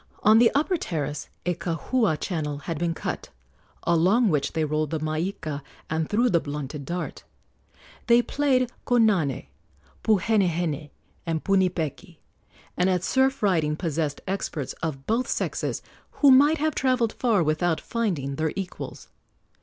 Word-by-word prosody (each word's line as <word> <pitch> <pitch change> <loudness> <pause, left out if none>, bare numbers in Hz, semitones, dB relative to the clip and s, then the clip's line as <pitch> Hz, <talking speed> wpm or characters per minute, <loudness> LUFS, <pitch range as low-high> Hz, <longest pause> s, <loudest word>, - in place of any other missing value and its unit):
On 215 +1 +7
the 235 -1 +6
upper 315 +6 +2
terrace 150 - -4 0.2
a 180 - +1
kahua 170 - 0
channel 150 -6 -2
had 165 -3 -3
been 170 -1 0
cut, - - -4 0.5
along 185 +8 +3
which 150 -4 0
they 160 -1 +1
rolled 155 0 -1
the 160 - -2
maika 155 -1 -3 0.3
and 160 -1 -1
threw 235 +4 +3
the 175 -8 +3
blunted 145 -1 -5
dart. 175 +5 -4 0.8
They 240 0 +6
played 255 -4 +1 0.2
konane, 210 - +2 0.6
puhenehene, 175 -8 +1 0.4
and 160 -1 -1
punipeki, 180 -2 0 0.6
and 180 +1 +2
at 180 -1 +1
surf 265 +4 +1
riding 160 -6 +2
possessed 155 -3 -2
experts 180 -7 -3
of 145 -5 -4
both 235 +3 0
sexes - - -2 0.3
who 285 -2 +5
might 290 +5 +6
have 310 +1 0
travelled 255 -4 +1
far 225 -8 +2
without 155 +2 +1
finding 165 - -2
their 160 -1 0
equals. 190 -2 -6
175 Hz, 140 wpm, -25 LUFS, 155-225 Hz, 0.8 s, On